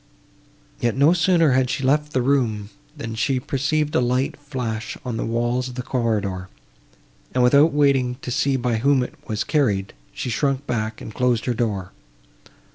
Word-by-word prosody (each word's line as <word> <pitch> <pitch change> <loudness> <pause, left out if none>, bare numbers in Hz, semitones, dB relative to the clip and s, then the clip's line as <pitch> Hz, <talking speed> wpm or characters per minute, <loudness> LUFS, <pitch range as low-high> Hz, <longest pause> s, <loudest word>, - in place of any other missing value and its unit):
Yet 120 +1 0
no 145 +5 +5
sooner 170 -3 +3
had 130 0 +2
she 135 - -2
left 150 +3 +2
the 130 -3 0
room, 115 -6 0 0.3
than 115 0 -5
she 130 +3 0
perceived 150 +3 -1
a 160 - +3
light 125 +2 0
flash 125 -6 -5
on 125 -2 -3
the - - -2
walls 120 +2 0
of 125 - -9
the 125 - -4
corridor, 105 -8 -1 0.9
and, 125 - +3
without 140 +6 +5
waiting 140 -4 +2
to 125 - -4
see 135 +2 +1
by 120 -3 0
whom 135 +2 +3
it - - -6
was 110 -3 -1
carried, 105 -11 0 0.2
she 125 - -4
shrunk 135 +3 0
back, 110 -3 -3
and 110 - -8
closed 125 -2 +1
her 125 - +1
door. 105 -6 -2
125 Hz, 175 wpm, -22 LUFS, 115-140 Hz, 0.9 s, no